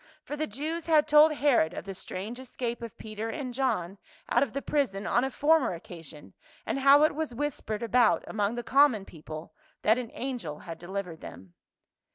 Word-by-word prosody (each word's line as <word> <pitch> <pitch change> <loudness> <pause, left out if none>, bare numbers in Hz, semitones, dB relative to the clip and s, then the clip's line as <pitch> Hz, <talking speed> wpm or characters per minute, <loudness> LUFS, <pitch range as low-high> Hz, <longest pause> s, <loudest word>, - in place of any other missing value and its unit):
For 295 - -5
the 310 +1 -2
Jews 310 +9 -4
had 310 -2 +4
told 300 +1 +7
Herod 280 - +2
of - - -6
the 195 - -5
strange 200 +5 -6
escape 245 -2 -4
of 230 -2 -8
Peter 215 +1 -5
and 255 -1 -4
John 200 -8 -1 0.3
out - - +4
of 275 -5 +1
the 275 - -3
prison 245 -10 0
on 240 - +2
a 265 - 0
former 295 - +3
occasion, 160 - -11 0.3
and - - -1
how 275 +2 +7
it 310 - +4
was 305 -5 -3
whis 290 +2 -2
pered 215 +1 -4
about 235 -1 +3
among 210 +1 -1
the 240 - -4
common 265 -8 +4
people 155 -1 -9 0.3
that 220 +3 +4
an 240 -3 -5
angel 245 - -4
had 165 0 -9
delivered 180 -2 -5
them. 95 -2 -11
240 Hz, 195 wpm, -28 LUFS, 195-280 Hz, 0.3 s, told